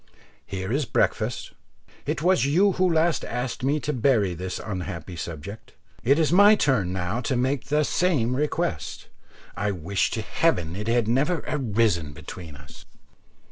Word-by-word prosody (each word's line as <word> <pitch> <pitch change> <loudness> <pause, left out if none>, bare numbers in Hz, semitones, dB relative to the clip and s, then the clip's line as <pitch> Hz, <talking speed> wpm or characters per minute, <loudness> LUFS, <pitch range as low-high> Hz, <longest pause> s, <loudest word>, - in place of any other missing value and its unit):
Here 95 +1 -4
is 145 +1 +1
breakfast. - - 0 0.6
It 150 +1 -1
was 185 +1 +4
you 185 +8 +4
who 185 -1 +2
last 165 +1 +2
asked 125 0 -4
me 145 +3 +2
to 150 - -2
bury 115 -7 +2
this 90 +2 -5
unhappy 90 -4 -5
subject, 85 +7 -7 0.3
it 135 +5 +4
is 160 -2 +2
my 205 +4 +7
turn 120 - +1
now 95 +6 -2
to 130 +2 -1
make 130 +1 0
the 150 +2 +2
same 140 -8 +1
request. 150 - -2 0.5
I 105 - -1
wish 95 0 -1
to - - -2
heaven 85 -1 0
it 105 +2 -5
had 115 -1 +2
never 145 +8 +1
arisen 105 - 0
between 80 +1 -9
us." 70 0 -14
120 Hz, 155 wpm, -25 LUFS, 95-150 Hz, 0.6 s, my